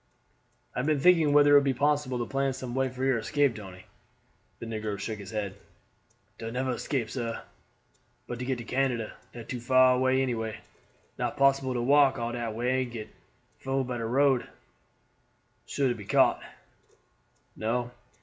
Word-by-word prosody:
"I - - -1
have 125 - -1
been 155 -2 +2
thinking 165 -1 +5
whether 145 0 +6
it 145 - +9
would - - -2
be 135 -2 +1
possible 145 -2 +1
to 120 - -2
plan 135 +2 -1
some 130 -2 -6
way 135 0 +1
for 130 +1 -4
your 130 -3 +2
escape, 140 0 +1
Tony." 95 -3 -10 0.7
The - - -8
negro 110 -2 -4
shook 105 +2 -5
his 100 -1 -9
head. 105 -3 -3 0.9
"Dar 115 - -5
never 130 +2 -2
escape, 120 -1 -2
sah, 115 -3 -4 0.8
but 120 - -6
to 125 - -3
get 130 -1 -1
to 120 - -7
Canada; 125 -2 -1 0.2
dat 120 -2 -10
too 125 - -4
far 130 +1 +4
any 130 -1 +2
way. 110 -2 -4 0.6
Not - - -2
possible 135 -1 +3
to 120 - -1
walk 140 +1 +5
all 120 -1 -2
dat 120 -2 -4
way 125 +3 +1
and 125 -2 -4
get 110 -2 -7 0.5
food 135 0 -1
by 125 -1 -3
de 115 - -3
road. 135 +1 +2 1.2
Suah 140 -2 0
to - - +1
be 105 -4 -10
caught." - - +3
125 Hz, 175 wpm, -28 LUFS, 115-135 Hz, 1.2 s, it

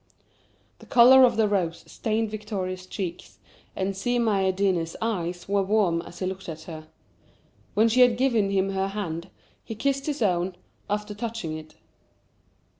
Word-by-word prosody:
The - - -15
colour 255 +2 +8
of 240 -3 +1
the 220 -1 +4
rose 180 -5 -1
stained 220 -1 -2
Victoria's 190 -4 -4
cheeks, 185 -3 -6 0.4
and 190 +1 -2
Si 245 +6 0
Maïeddine's 190 -6 +1
eyes 180 -6 -3
were 200 0 +2
warm 195 -4 +2
as 175 - -12
he 185 - -3
looked 190 -1 -5
at 160 -1 -7
her. 155 -2 -9 0.9
When 220 +2 +5
she 240 +3 +3
had 245 -2 +5
given 235 -6 +2
him 195 0 +1
her 190 0 0
hand, 185 -4 -4 0.3
he 225 - -7
kissed 275 +4 -1
his 290 -5 -1
own, 180 -2 0 0.3
after 210 0 -2
touching 220 -7 -4
it. 155 0 -10
195 Hz, 155 wpm, -26 LUFS, 185-225 Hz, 0.9 s, colour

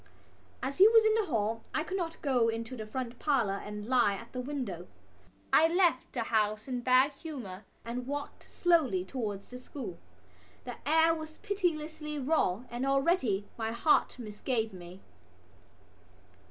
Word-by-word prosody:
As 275 +4 -3
he 395 - +10
was 450 0 +6
in 435 - +5
the 440 -2 +1
hall 225 -4 -1
I 310 - +1
could 375 - -4
not 340 -4 -4
go 250 -5 +3
into 230 +2 -4
the 215 -3 -6
front 245 +1 -5
parlour 230 -10 +1
and 210 0 -6
lie 235 -4 +3
at 230 +3 -11
the 255 - -4
window. 245 - -4 0.7
I 320 - +7
left 340 -6 +2
the 240 - -1
house 215 0 0
in 250 -2 -2
bad 255 +3 +4
humour 255 - -8 0.2
and 245 +2 -4
walked 285 +1 -6
slowly 290 - +2
towards 205 -3 -5
the 250 - -7
school. 280 +6 -7 0.6
The - - -7
air 320 +1 +5
was 315 -1 -7
pitilessly 315 -7 -2
raw 255 - +1
and 240 +2 -3
already 275 - +2
my 225 0 -1
heart 275 +4 +2
misgave 220 0 -2
me. 180 +1 -11
255 Hz, 155 wpm, -31 LUFS, 220-310 Hz, 0.7 s, he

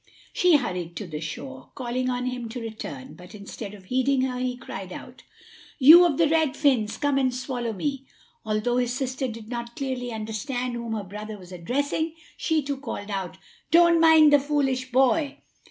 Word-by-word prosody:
She 360 -3 +4
hurried 180 - -4
to 210 - -5
the 155 -4 -6
shore, 130 -4 -7
calling 255 0 -2
on 250 0 -2
him 250 -2 -4
to 245 +2 -6
return; 215 - -7
but 180 +3 -13
instead 205 0 -8
of 195 - -15
heeding 260 +4 +1
her, 255 -1 -1
he 250 -1 -2
cried 195 -6 -8
out: 250 +7 -10 0.6
"You 325 +6 +9
of 290 -5 -1
the 330 - +4
red 310 -2 +1
fins, 235 -7 +2
come 285 -1 +1
and 260 -1 +2
swallow 250 -2 -3
me!" 270 +6 -4 0.4
Although 220 +3 0
his 245 -1 0
sister 260 0 -2
did 225 -2 -8
not 235 0 -6
clearly 255 -3 -3
understand 240 +3 -3
whom 235 -1 -4
her 215 -2 -3
brother 210 +3 -7
was 185 -2 -14
addressing, 285 - -2 0.2
she 320 -2 0
too 280 0 -3
called 210 -6 -6
out: 190 -2 -4 0.3
"Don't 340 0 +6
mind 320 -2 +7
the 290 - +7
foolish 270 -3 -1
boy!" 270 +3 +2
250 Hz, 185 wpm, -25 LUFS, 215-275 Hz, 0.6 s, You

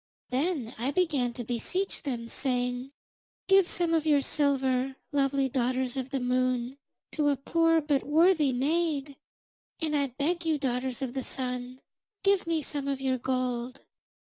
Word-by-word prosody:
Then 270 -3 -1
I 250 +4 0
began 285 -7 +1
to 240 - -5
beseech 250 - -2
them, 240 -6 -4
saying: 250 0 -1 0.6
"Give 385 -2 +5
some 345 -2 +2
of 320 -2 +2
your 295 -3 +4
silver, 270 -2 +1 0.2
lovely 275 -1 +2
daughters 255 0 -1
of 260 -1 -3
the 270 - -1
Moon, 255 +1 0 0.3
to 295 -2 +1
a 285 - +1
poor 330 +3 +2
but 290 -2 +1
worthy 315 -1 +4
maid; 290 +1 0 0.6
and 310 -2 -1
I 280 -1 +2
beg 295 +7 -1
you, 320 -2 +1
daughters 260 -1 -2
of 250 -2 -3
the 265 -1 -3
Sun, 250 0 -3 0.4
give 395 -3 +3
me 325 -2 0
some 285 0 -3
of 275 -1 -1
your 260 -1 0
gold." 250 0 -2
270 Hz, 155 wpm, -28 LUFS, 255-310 Hz, 0.6 s, Give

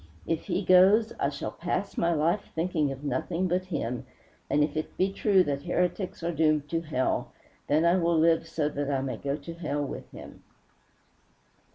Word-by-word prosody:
If 165 -1 -2
he 200 - -1
goes, 195 +5 +6
I 140 - +1
shall 140 -1 -5
pass 185 +3 -3
my 170 - +1
life 165 +5 0
thinking 160 -4 0
of 135 +1 -8
nothing 165 +5 -1
but 180 +1 0
him, 125 -8 -3 0.5
and 150 - +3
if 150 0 -2
it 155 - -4
be 195 +1 +1
true 195 -3 +4
that 140 -3 -2
heretics 180 +2 -1
are 170 - 0
doomed 155 -2 +2
to 165 -1 -1
hell, 150 -5 -1 0.4
then 155 +3 +3
I 170 +2 +4
will 170 -2 +2
live 165 0 +3
so 160 -2 -1
that 145 -1 -3
I 135 -2 0
may 130 -4 -3
go 140 +3 -2
to 155 +3 -8
hell 150 -4 -2
with - - -7
him." - - -12
165 Hz, 190 wpm, -28 LUFS, 145-180 Hz, 0.5 s, goes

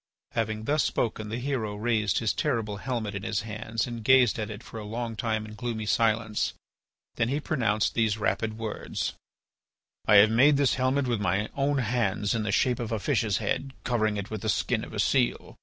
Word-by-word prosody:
Having 110 -1 -2
thus 150 +6 +2
spoken 110 -2 -1
the 115 - -3
hero 125 -5 -2
raised 110 -1 +1
his 110 -2 +1
terrible 115 -9 -1
helmet 115 -2 -3
in 100 - -4
his 105 +1 -1
hands 110 +1 -3
and 120 -2 -6
gazed 125 -1 +5
at 105 - -3
it 105 +1 -8
for 115 - -8
a - - -6
long 115 +2 -4
time 110 -1 -1
in 110 - -10
gloomy 110 -1 -4
silence. 110 0 +1 0.6
Then 115 - +1
he 140 +3 0
pronounced 115 -9 0
these 110 -2 +1
rapid 110 0 -1
words: 110 -2 -3 0.9
"I 105 - +6
have 105 +2 +8
made 135 +6 +5
this 140 -2 +3
helmet 130 +2 +1
with 120 -4 -1
my 105 +2 0
own 140 +1 +1
hands 110 -5 0
in 115 - 0
the 105 -2 -1
shape 125 +4 +2
of 115 -2 -4
a 110 - 0
fish's 110 -4 +1
head, 135 -1 -2
covering 110 -4 +1
it 100 +1 -5
with 110 -2 -4
the 110 - -2
skin - - 0
of - - -8
a - - -5
seal. - - +1
110 Hz, 205 wpm, -27 LUFS, 105-125 Hz, 0.9 s, have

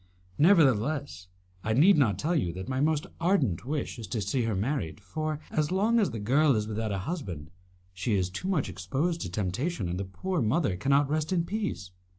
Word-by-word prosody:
Nevertheless, 140 - +3 0.4
I 110 - 0
need 170 - +6
not 125 -9 +3
tell 170 +4 0
you 90 - +1
that 95 +3 -6
my 130 0 -1
most 155 0 +1
ardent 150 - +1
wish 145 -4 -3
is 110 - -6
to 100 +5 -2
see 110 +5 0
her 110 -3 -1
married, 105 - -2
for, 155 +10 -4
as 150 0 0
long 215 +5 +3
as 205 - +2
a 115 - -5
girl 135 +6 +3
is 105 -1 -1
without 110 0 -2
a 100 - -1
husband, 90 - -5 0.4
she 100 +4 -1
is 90 -2 0
too 185 - -5
much 180 -7 +1
exposed 135 - -2
to - - -3
temptation, 105 - -2
and 90 +1 -3
the 100 - -3
poor 180 - -3
mother 120 - +1
cannot 140 +8 +2
rest 155 +2 -1
in 170 -3 +1
peace." 100 - -3
130 Hz, 200 wpm, -28 LUFS, 100-155 Hz, 0.4 s, need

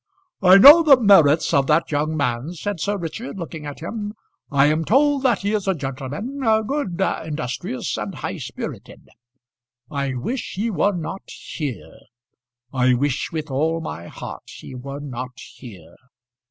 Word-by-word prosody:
"I 185 0 +8
know 290 +11 +10
the 285 -5 +6
merits 165 - +5
of 135 -1 +3
that 155 +2 +2
young 155 +2 -1
man," 130 +3 -2
said 195 +2 -4
Sir 205 +6 -1
Richard, 190 +7 -6
looking 160 -4 -7
at 145 - -8
him; 210 +4 -5 0.3
"I 140 -1 +4
am 155 +2 +2
told 280 - +3
that 250 -5 +2
he 200 +2 -1
is 205 -2 -1
a 190 - +2
gentleman, 145 - -5 0.3
good, 240 - -3
industrious, 160 - -3
and 105 -2 -5
high - - -5
spirited. - - -8 0.8
I 140 -2 -2
wish 230 - -4
he 220 +5 -1
were 205 +1 +1
not 170 +3 -6
here; 145 -8 -7 0.7
I 125 -1 +3
wish 135 +1 -1
with 155 -3 -5
all 160 +5 0
my 85 - -7
heart - - -9
he - - -11
were 140 +3 -7
not 125 -3 -7
here." 95 -10 -13
160 Hz, 155 wpm, -22 LUFS, 140-205 Hz, 0.8 s, know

